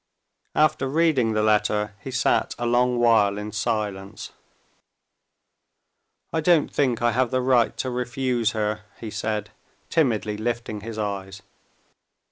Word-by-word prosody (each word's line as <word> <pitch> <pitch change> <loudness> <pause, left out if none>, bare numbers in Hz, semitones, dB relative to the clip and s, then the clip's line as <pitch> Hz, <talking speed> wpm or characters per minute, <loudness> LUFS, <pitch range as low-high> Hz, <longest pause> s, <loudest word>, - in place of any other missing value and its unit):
After 145 -3 +2
reading 145 -7 +2
the 110 0 +1
letter, 105 -1 +1
he 135 - -8
sat 130 - +1
a 120 - -3
long 125 +1 +2
while 110 -4 +4
in 105 +1 -5
silence. 105 -3 -3 2.0
"I 160 - +1
don't 165 -2 +3
think 125 -5 +1
I 120 - +4
have 125 +1 +1
the 130 - 0
right 125 -2 +2
to 130 - -2
refuse 125 -2 -1
her," 105 -1 -1 0.2
he 110 - -6
said, 105 -1 -3 0.4
timidly 110 -8 +1
lifting 115 -1 -3
his 110 +1 -7
eyes. 100 -2 -4
115 Hz, 130 wpm, -24 LUFS, 105-125 Hz, 2.0 s, while